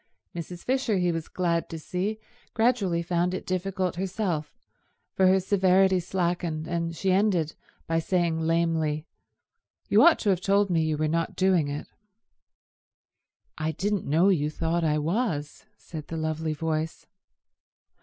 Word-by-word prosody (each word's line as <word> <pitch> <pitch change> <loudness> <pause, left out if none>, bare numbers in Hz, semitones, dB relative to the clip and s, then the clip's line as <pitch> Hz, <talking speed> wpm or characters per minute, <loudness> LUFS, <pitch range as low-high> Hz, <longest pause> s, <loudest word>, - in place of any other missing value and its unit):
Mrs. 175 +1 -7
Fisher, 255 -5 +1
he 180 -1 +2
was 165 -1 -4
glad 170 -2 -1
to 165 - -5
see, 185 +7 -3 0.4
gradually 220 -8 +2
found 175 +1 0
it - - -6
difficult 185 -1 -2
herself, 180 -5 -2 0.6
for 190 - +4
her 190 +1 +5
severity 190 0 +3
slackened, 175 -3 -2
and 170 -1 -2
she 190 +2 0
ended 185 -5 +2 0.3
by 165 0 +1
saying 170 -1 0
lamely, 160 -2 0 0.8
"You - - +5
ought 340 - +7
to 205 - +2
have 185 -2 0
told 200 0 +2
me 165 -2 +3
you 155 -1 0
were 155 +1 +1
not 165 +2 -1
doing 185 -5 +3
it." 145 +1 -4 1.7
"I 160 0 -1
didn't 200 +2 -1
know 165 +7 +4
you 150 -6 +2
thought 165 +2 -1
I 150 -1 +2
was," 160 0 -2
said 155 -3 -9
the 165 - -5
lovely 160 0 -2
voice. 160 +1 -3
170 Hz, 145 wpm, -26 LUFS, 160-190 Hz, 1.7 s, ought